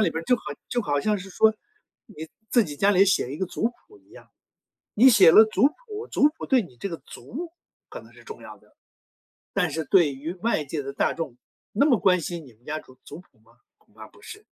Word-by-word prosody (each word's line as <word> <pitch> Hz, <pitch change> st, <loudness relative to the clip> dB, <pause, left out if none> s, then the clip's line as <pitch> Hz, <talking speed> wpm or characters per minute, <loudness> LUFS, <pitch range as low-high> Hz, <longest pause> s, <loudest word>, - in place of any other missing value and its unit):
里 215 Hz, -, +2 dB
边 165 Hz, -, -4 dB
儿， -, -, -12 dB
就 250 Hz, -, +3 dB
好 -, -, -16 dB, 0.3 s
就 240 Hz, -2 st, -1 dB
好 145 Hz, -5 st, -1 dB
像 210 Hz, +6 st, 0 dB
是 195 Hz, +1 st, -10 dB
说 220 Hz, +3 st, +3 dB, 0.5 s
你 160 Hz, -8 st, -10 dB, 0.2 s
自 240 Hz, -, +4 dB
己 145 Hz, -6 st, -7 dB
家 200 Hz, +5 st, +3 dB
里 195 Hz, 0 st, +5 dB
写 140 Hz, -8 st, +1 dB
一 150 Hz, -, -7 dB
个 190 Hz, -, -2 dB
族 -, -, -5 dB
谱 410 Hz, -, -22 dB
一 -, -, -30 dB
样， -, -, -16 dB, 0.6 s
你 255 Hz, +5 st, +6 dB
写 195 Hz, -8 st, +7 dB
了 220 Hz, -, +9 dB
族 215 Hz, +4 st, +3 dB
谱， 435 Hz, +5 st, -9 dB
族 295 Hz, -, +3 dB
谱 -, -, -6 dB
对 260 Hz, -3 st, +3 dB
你 125 Hz, -, -13 dB
这 200 Hz, -, -4 dB
个 165 Hz, -3 st, -6 dB
族， 330 Hz, +6 st, -9 dB, 0.4 s
可 -, -, -8 dB
能 -, -, -17 dB
是 -, -, -17 dB
重 445 Hz, -, -11 dB
要 -, -, -11 dB
的。 -, -, -28 dB, 0.8 s
但 180 Hz, -5 st, +1 dB
是 160 Hz, +2 st, -3 dB
对 165 Hz, -8 st, +3 dB
于 155 Hz, +6 st, -6 dB
外 185 Hz, -5 st, -1 dB
界 145 Hz, 0 st, -4 dB
的 140 Hz, 0 st, -7 dB
大 -, -, 0 dB
众， 160 Hz, -8 st, -6 dB, 0.4 s
那 280 Hz, +8 st, +2 dB
么 245 Hz, -8 st, +3 dB
关 180 Hz, -2 st, +3 dB
心 170 Hz, 0 st, -6 dB
你 130 Hz, -, -16 dB
们 115 Hz, +3 st, -30 dB
家 155 Hz, +1 st, -3 dB
族 130 Hz, -4 st, -17 dB
族 150 Hz, -, -10 dB
谱 175 Hz, -, -27 dB
吗？ 115 Hz, +1 st, -26 dB, 0.3 s
恐 -, -, -33 dB
怕 -, -, -11 dB
不 -, -, -22 dB
是。 425 Hz, -1 st, -12 dB
185 Hz, 265 characters per minute, -24 LUFS, 150-235 Hz, 0.8 s, 了